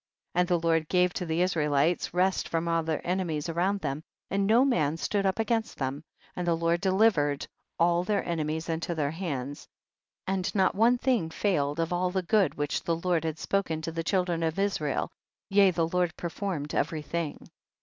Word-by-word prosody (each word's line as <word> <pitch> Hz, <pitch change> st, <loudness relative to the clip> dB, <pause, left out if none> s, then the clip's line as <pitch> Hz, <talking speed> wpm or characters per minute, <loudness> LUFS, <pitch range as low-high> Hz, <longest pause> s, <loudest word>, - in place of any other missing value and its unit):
25. 180 Hz, -, +3 dB
And 180 Hz, -, +1 dB, 0.2 s
the -, -, +1 dB
Lord 165 Hz, -1 st, +2 dB
gave 180 Hz, -1 st, +3 dB
to 180 Hz, -, -4 dB
the 165 Hz, +2 st, +1 dB
Israelites 155 Hz, -2 st, +1 dB
rest 185 Hz, +2 st, +1 dB
from 165 Hz, 0 st, -1 dB
all 165 Hz, 0 st, +2 dB
their 160 Hz, -1 st, -3 dB
enemies 175 Hz, -5 st, -1 dB
around 185 Hz, +4 st, 0 dB
them, 145 Hz, 0 st, -3 dB, 0.3 s
and 195 Hz, +1 st, +1 dB
no 235 Hz, +5 st, +5 dB
man 160 Hz, -, +1 dB
stood 200 Hz, +3 st, 0 dB
up 190 Hz, -, 0 dB
against 225 Hz, 0 st, -1 dB
them, 135 Hz, +1 st, -3 dB, 0.3 s
and 180 Hz, -1 st, -3 dB
the 170 Hz, -1 st, +2 dB
Lord 170 Hz, +1 st, +1 dB
delivered 190 Hz, -8 st, +2 dB, 0.3 s
all 170 Hz, +1 st, +3 dB
their 200 Hz, +1 st, -1 dB
enemies 160 Hz, -1 st, -2 dB
into 170 Hz, +1 st, -2 dB
their 145 Hz, -2 st, 0 dB
hands, 145 Hz, -5 st, -5 dB, 0.6 s
and 190 Hz, +1 st, -2 dB
not 190 Hz, -2 st, +3 dB
one 230 Hz, +5 st, +4 dB
thing 240 Hz, -10 st, +1 dB
failed 160 Hz, -5 st, 0 dB
of 165 Hz, +1 st, 0 dB
all 180 Hz, +1 st, +1 dB
the 185 Hz, 0 st, -1 dB
good 195 Hz, -2 st, +2 dB
which 145 Hz, -1 st, -1 dB
the 165 Hz, -, 0 dB
Lord 170 Hz, -1 st, 0 dB
had 160 Hz, -1 st, -2 dB
spoken 185 Hz, -5 st, -1 dB
to 165 Hz, -, -3 dB
the 165 Hz, 0 st, -3 dB
children 180 Hz, -1 st, 0 dB
of 165 Hz, +1 st, -1 dB
Israel, 195 Hz, -8 st, -1 dB, 0.4 s
yea 195 Hz, -1 st, +6 dB
the 165 Hz, -2 st, 0 dB
Lord 175 Hz, -1 st, 0 dB
performed 170 Hz, -4 st, -4 dB
every 155 Hz, -2 st, -1 dB
thing. 165 Hz, 0 st, -4 dB
170 Hz, 190 wpm, -28 LUFS, 160-190 Hz, 0.6 s, yea